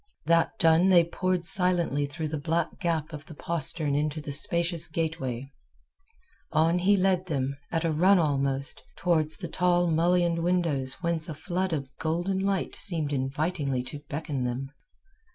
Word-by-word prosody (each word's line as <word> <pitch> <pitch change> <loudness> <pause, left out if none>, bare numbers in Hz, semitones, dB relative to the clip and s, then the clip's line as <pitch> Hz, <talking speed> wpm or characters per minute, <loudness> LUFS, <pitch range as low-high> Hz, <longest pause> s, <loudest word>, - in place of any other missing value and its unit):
That 165 +6 +2
done 165 +3 +4
they 175 -2 +7
poured 180 +1 -1
silently 170 -6 +1
through 155 +2 -4
that 155 -1 -3
black 165 +1 -1
gap 165 -3 -1
of 150 0 -8
the 160 - -10
postern 155 -2 -1
into 150 +2 0
the 145 -1 -6
spacious 170 +3 0
gateway. 150 -6 -3 1.0
On 165 +2 +3
he 200 +3 +4
led 185 -1 +1
them, 140 -3 -1 0.2
at 165 0 0
a 165 - +1
run 185 +6 +5
almost, 140 -3 0
towards 160 -3 +1
the 180 - -5
tall 175 +1 +2
mullioned 170 +1 +2
windows 165 -7 0
whence 170 0 -1
a 155 - -5
flood 185 +3 -2
of 140 -4 -2
golden 175 +4 -1
light 195 -1 -1
seemed 160 -6 0
invitingly 140 0 -1
to 145 +3 -7
beckon 145 -3 -3
them. 125 +2 -3
165 Hz, 155 wpm, -27 LUFS, 145-175 Hz, 1.0 s, they